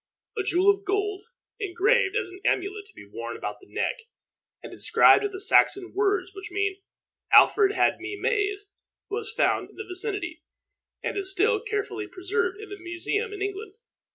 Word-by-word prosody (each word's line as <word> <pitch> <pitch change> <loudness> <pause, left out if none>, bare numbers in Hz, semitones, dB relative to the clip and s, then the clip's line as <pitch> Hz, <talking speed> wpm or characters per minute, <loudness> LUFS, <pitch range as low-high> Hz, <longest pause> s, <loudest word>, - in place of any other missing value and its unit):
A 430 - 0
jewel 375 +1 +4
of 400 0 -4
gold, 405 0 -1 0.3
engraved 405 +2 +2
as - - -1
an 375 +1 -12
amulet 400 +2 -1
to 435 - -14
be - - -12
worn - - -6
about - - -5
the 385 - -20
neck, - - -1 0.7
and - - -9
inscribed - - +5
with 410 - -2
the 380 - -7
Saxon 395 -1 +3
words 400 -2 +1
which 390 -1 -8
mean 400 +1 -1 0.6
"Alfred 405 -2 +6
had - - +2
me 380 +3 -5
made," 410 -2 0 0.5
was 445 +1 -3
found 450 - +1
in - - -19
the 430 - -7
vicinity, 365 -1 -3 0.6
and - - -2
is 390 -1 -2
still 415 +4 +2
carefully 415 -2 -3
preserved 380 +1 -2
in 430 -1 -10
a 405 - -6
museum 360 +6 -2
in 400 -1 -4
England. 400 0 -5
400 Hz, 175 wpm, -26 LUFS, 380-420 Hz, 0.7 s, Alfred